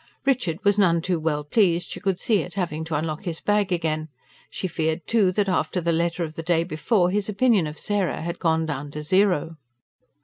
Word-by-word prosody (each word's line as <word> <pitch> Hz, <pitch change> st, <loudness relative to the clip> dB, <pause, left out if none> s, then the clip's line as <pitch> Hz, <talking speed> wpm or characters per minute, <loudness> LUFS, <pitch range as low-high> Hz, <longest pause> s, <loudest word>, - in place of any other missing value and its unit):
Richard 245 Hz, -, +1 dB
was 205 Hz, 0 st, +3 dB
none 170 Hz, -4 st, +4 dB
too 180 Hz, -2 st, 0 dB
well 155 Hz, -2 st, -1 dB
pleased, 175 Hz, +1 st, +1 dB
she -, -, -6 dB
could 195 Hz, -3 st, -1 dB
see, 215 Hz, -7 st, +2 dB
at 175 Hz, -, -8 dB
having 165 Hz, -5 st, -2 dB
to 160 Hz, 0 st, -3 dB
unlock 155 Hz, +4 st, -3 dB
his 165 Hz, -2 st, -3 dB
bag 205 Hz, -2 st, +1 dB
again; 160 Hz, -2 st, -1 dB, 0.4 s
she 185 Hz, -, -4 dB
feared 160 Hz, -1 st, -2 dB
too, 210 Hz, -5 st, +3 dB
that, 205 Hz, +1 st, +1 dB
after 185 Hz, 0 st, 0 dB
the 170 Hz, -1 st, 0 dB
letter 170 Hz, +1 st, 0 dB
of 155 Hz, -2 st, -5 dB
the 165 Hz, -, -5 dB
day 165 Hz, 0 st, +1 dB
before, 180 Hz, +3 st, +1 dB
his 205 Hz, +1 st, -1 dB
opinion 210 Hz, -5 st, +3 dB
of 150 Hz, 0 st, -7 dB
Sarah 200 Hz, -4 st, -1 dB
had 170 Hz, +1 st, -4 dB
gone 160 Hz, -1 st, +1 dB
down 145 Hz, -2 st, -4 dB
to 150 Hz, -, -5 dB
zero. 180 Hz, -2 st, +2 dB
170 Hz, 210 wpm, -24 LUFS, 160-195 Hz, 0.4 s, none